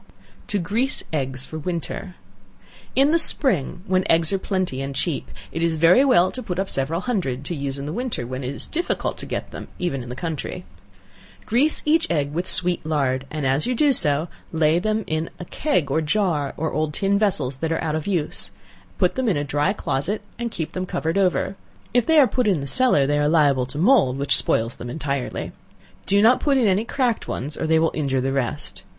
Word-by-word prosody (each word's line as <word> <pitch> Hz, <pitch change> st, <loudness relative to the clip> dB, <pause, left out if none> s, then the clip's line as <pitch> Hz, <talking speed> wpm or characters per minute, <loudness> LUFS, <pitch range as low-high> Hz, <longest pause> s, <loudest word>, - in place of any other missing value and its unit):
To 205 Hz, -, -1 dB
Grease 220 Hz, +9 st, 0 dB
Eggs 135 Hz, -3 st, -1 dB
for 155 Hz, -, -7 dB
Winter. 175 Hz, +2 st, -4 dB, 0.8 s
In 275 Hz, +3 st, +4 dB
the 335 Hz, -, +4 dB
spring 190 Hz, -, +3 dB
when 185 Hz, -2 st, +1 dB
eggs 165 Hz, +2 st, +3 dB
are 195 Hz, -, +1 dB
plenty 185 Hz, -10 st, -2 dB
and 135 Hz, 0 st, -5 dB
cheap, 160 Hz, +1 st, -2 dB, 0.2 s
it 165 Hz, -, -4 dB
is 165 Hz, -1 st, +1 dB
very 170 Hz, -, +5 dB
well 235 Hz, -10 st, +4 dB
to 255 Hz, -, -5 dB
put 180 Hz, -7 st, -4 dB
up 195 Hz, 0 st, -1 dB
several 155 Hz, +6 st, -2 dB
hundred, 145 Hz, -, -2 dB
to 175 Hz, -, -2 dB
use 140 Hz, -1 st, -4 dB
in 140 Hz, -, -5 dB
the 150 Hz, -, -4 dB
winter, 240 Hz, -, -3 dB
when 130 Hz, +2 st, -5 dB
it 130 Hz, +3 st, -4 dB
is -, -, -8 dB
very -, -, -15 dB
difficult -, -, -3 dB
to -, -, -6 dB
get -, -, -4 dB
them, -, -, -8 dB
even 170 Hz, -7 st, -2 dB
in 120 Hz, -, -9 dB
the 125 Hz, -, -5 dB
country. 165 Hz, +4 st, -5 dB, 0.8 s
Grease 275 Hz, +8 st, +3 dB
each 320 Hz, +2 st, +3 dB
egg 145 Hz, -4 st, 0 dB
with 175 Hz, +3 st, -2 dB
sweet 180 Hz, -1 st, +1 dB
lard, 135 Hz, -4 st, -1 dB
and 155 Hz, -2 st, -4 dB
as 135 Hz, -, +2 dB
you 250 Hz, -, 0 dB
do 285 Hz, +3 st, +4 dB
so, 150 Hz, -, +2 dB, 0.2 s
lay 160 Hz, 0 st, +2 dB
them 215 Hz, +3 st, -1 dB
in 155 Hz, +1 st, -2 dB
a 175 Hz, -, -6 dB
keg 180 Hz, -, -1 dB
or 160 Hz, -, +2 dB
jar, 155 Hz, -4 st, 0 dB
or 160 Hz, +1 st, -2 dB
old 155 Hz, 0 st, -1 dB
tin 200 Hz, 0 st, +1 dB
vessels 145 Hz, -11 st, 0 dB
that 160 Hz, +3 st, -2 dB
are 165 Hz, -, -1 dB
out 155 Hz, -2 st, -1 dB
of 155 Hz, +2 st, -3 dB
use; 175 Hz, -6 st, -1 dB, 0.5 s
put -, -, +2 dB
them 260 Hz, -3 st, 0 dB
in 180 Hz, -, +1 dB
a 145 Hz, -, -1 dB
dry 145 Hz, +5 st, +1 dB
closet 200 Hz, +2 st, -2 dB, 0.2 s
and 235 Hz, 0 st, -2 dB
keep 165 Hz, -8 st, -4 dB
them 185 Hz, 0 st, -4 dB
covered 160 Hz, -1 st, -2 dB
over; 195 Hz, 0 st, +1 dB, 0.4 s
if 245 Hz, -1 st, +2 dB
they 320 Hz, -1 st, +4 dB
are 290 Hz, -, +8 dB
put 250 Hz, -2 st, 0 dB
in 190 Hz, -6 st, +2 dB
the 140 Hz, -, -4 dB
cellar, 195 Hz, -, +3 dB
they 145 Hz, +1 st, +1 dB
are 145 Hz, 0 st, +2 dB
liable 140 Hz, -5 st, +3 dB
to 135 Hz, +3 st, -8 dB
mould, 180 Hz, -, +4 dB
which 140 Hz, 0 st, +2 dB
spoils 115 Hz, +1 st, +1 dB
them 120 Hz, -, -7 dB
entirely. 140 Hz, -1 st, -3 dB, 0.6 s
Do 200 Hz, +1 st, +4 dB
not 245 Hz, +3 st, +6 dB
put 280 Hz, -2 st, +2 dB
in 250 Hz, -, +3 dB
any 200 Hz, +2 st, +2 dB
cracked 245 Hz, -2 st, -1 dB
ones, 145 Hz, +4 st, -4 dB
or -, -, -3 dB
they 160 Hz, 0 st, +4 dB
will 165 Hz, 0 st, +2 dB
injure 140 Hz, -4 st, 0 dB
the 135 Hz, +1 st, -1 dB
rest. 135 Hz, -3 st, -3 dB
165 Hz, 220 wpm, -22 LUFS, 140-205 Hz, 0.8 s, are